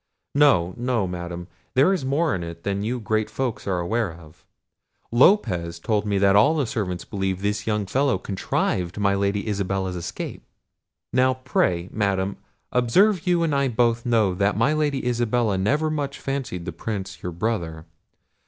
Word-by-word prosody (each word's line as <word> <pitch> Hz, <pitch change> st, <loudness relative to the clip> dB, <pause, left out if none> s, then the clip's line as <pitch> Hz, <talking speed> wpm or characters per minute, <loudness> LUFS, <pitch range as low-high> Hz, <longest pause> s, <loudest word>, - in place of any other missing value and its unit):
No, 95 Hz, -12 st, +4 dB
no, 120 Hz, -4 st, 0 dB
Madam, 85 Hz, -1 st, -5 dB, 0.3 s
there 140 Hz, +9 st, +5 dB
is 180 Hz, -7 st, -2 dB
more 145 Hz, +4 st, +1 dB
in 90 Hz, -, -2 dB
it 85 Hz, 0 st, -8 dB
than 100 Hz, 0 st, -1 dB
you 120 Hz, +4 st, -2 dB
great 110 Hz, 0 st, -1 dB
folks 130 Hz, -6 st, -3 dB
are 95 Hz, -2 st, 0 dB
aware 105 Hz, +3 st, 0 dB
of. 80 Hz, -2 st, -15 dB, 0.7 s
Lopez 95 Hz, -, +3 dB
told 105 Hz, +4 st, -1 dB
me 100 Hz, -1 st, +1 dB
that 100 Hz, 0 st, +4 dB
all 125 Hz, +10 st, +5 dB
the 145 Hz, -4 st, +1 dB
servants 100 Hz, -8 st, -3 dB
believe 95 Hz, -2 st, -2 dB
this 105 Hz, +1 st, -1 dB
young 105 Hz, -2 st, 0 dB
fellow 135 Hz, +7 st, +1 dB
contrived 90 Hz, -2 st, -2 dB
my 100 Hz, -1 st, +2 dB
Lady 100 Hz, +1 st, 0 dB
Isabella's 95 Hz, -2 st, -1 dB
escape; 85 Hz, -, -6 dB, 0.7 s
now, 130 Hz, +1 st, +3 dB
pray, 90 Hz, -9 st, 0 dB
Madam, 100 Hz, -2 st, 0 dB, 0.3 s
observe 170 Hz, -, +3 dB
you 175 Hz, -1 st, +3 dB
and 160 Hz, -3 st, +1 dB
I 140 Hz, -1 st, +2 dB
both 115 Hz, -1 st, +1 dB
know 110 Hz, -6 st, +2 dB
that 100 Hz, +3 st, +1 dB
my 115 Hz, +7 st, +3 dB
Lady 145 Hz, -4 st, 0 dB
Isabella 120 Hz, -3 st, +1 dB
never 150 Hz, +12 st, +1 dB
much 145 Hz, -2 st, -3 dB
fancied 135 Hz, -11 st, -4 dB
the 90 Hz, -, -3 dB
Prince 95 Hz, +3 st, -5 dB
your 90 Hz, -, -4 dB
brother. 85 Hz, -4 st, -3 dB
105 Hz, 165 wpm, -24 LUFS, 95-130 Hz, 0.7 s, there